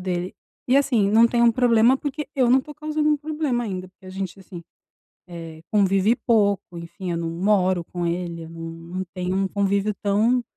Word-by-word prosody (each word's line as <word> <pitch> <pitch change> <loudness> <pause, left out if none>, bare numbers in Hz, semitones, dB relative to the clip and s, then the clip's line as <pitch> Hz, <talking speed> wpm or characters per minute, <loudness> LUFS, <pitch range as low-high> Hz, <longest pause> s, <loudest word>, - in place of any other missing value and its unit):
dele, 180 0 -3 0.3
e 260 - +5
assim, 240 -8 +2
não 225 +2 +6
tem 235 0 +1
um 235 -1 +5
problema, 240 +1 +4
porque 295 +2 -5
eu 255 -3 +2
não 260 +2 +5
tô 300 +2 -11
causando 305 0 -1
um 300 - +3
problema 295 -5 -2
ainda, 185 -3 -5
porque 185 +1 -20
a - - -8
gente, 190 0 -6
assim, 175 -2 -10 0.7
eh, 165 -2 -9
convive 200 +2 +3
pouco, 200 -6 +1
enfim, 175 +2 -6
eu - - -2
não 165 -1 -3
moro 185 -1 +1
com 175 0 -5
ele, 170 -1 -3
eu 160 - -11
não 165 0 -7
não 170 +3 -6
tenho 180 +1 -2
um 195 0 0
convívio 200 +1 0
tão 220 +5 +2
200 Hz, 200 wpm, -23 LUFS, 180-240 Hz, 0.7 s, não